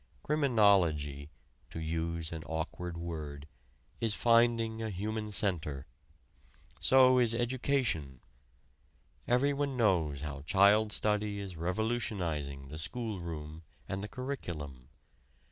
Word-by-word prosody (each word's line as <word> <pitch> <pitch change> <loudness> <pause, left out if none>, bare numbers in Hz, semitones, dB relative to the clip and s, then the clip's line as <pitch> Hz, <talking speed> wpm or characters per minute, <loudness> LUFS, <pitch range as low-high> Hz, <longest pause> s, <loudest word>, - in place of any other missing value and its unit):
Criminology 95 - +2 0.4
(to - - -6
use 80 0 -2
an 80 -1 -5
awkward 85 +2 -4
word) 75 -4 -6 0.5
is 110 -3 0
finding 115 -1 +3
a 110 - -2
human 105 +2 -3
center. 80 -9 -1 0.9
So 130 -1 +6
is 115 -2 +3
education. 120 - 0 1.1
Everyone 140 +2 +1
knows 85 - +2
how 75 -2 -5
child 100 +7 +4
study 105 -1 0
is 95 -3 -6
revolutionizing 85 - -2
the 75 +2 -7
school 105 +4 -3
room 80 -2 -6 0.3
and 95 +1 -3
the - - -3
curriculum. 85 - -6
95 Hz, 105 wpm, -32 LUFS, 80-115 Hz, 1.1 s, So